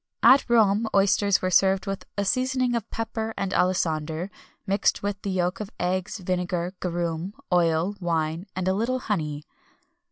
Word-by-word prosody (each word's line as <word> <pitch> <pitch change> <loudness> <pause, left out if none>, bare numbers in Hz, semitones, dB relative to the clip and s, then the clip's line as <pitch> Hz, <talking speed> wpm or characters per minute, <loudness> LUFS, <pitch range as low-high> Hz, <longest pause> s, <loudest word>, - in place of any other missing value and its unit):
At 265 -1 +6
Rome 220 -1 +4
oysters 200 0 +3
were 185 - 0
served 190 +2 +3
with 195 -1 -4
a 200 - 0
seasoning 255 +2 +1
of 230 -2 -2
pepper 225 0 -4
and 195 -1 -2
alisander, 165 -1 0 0.3
mixed 200 +1 +1
with 200 0 -3
the 200 - -4
yolks 180 +1 -1
of 205 - -5
eggs, 185 +3 -1
vinegar, 180 -1 -2
garum, 175 +2 -3 0.2
oil, 170 +2 +2
wine, 165 0 -1
and 185 0 -2
a 190 - +3
little 230 +6 0
honey. 155 - -3
190 Hz, 155 wpm, -25 LUFS, 175-205 Hz, 0.3 s, At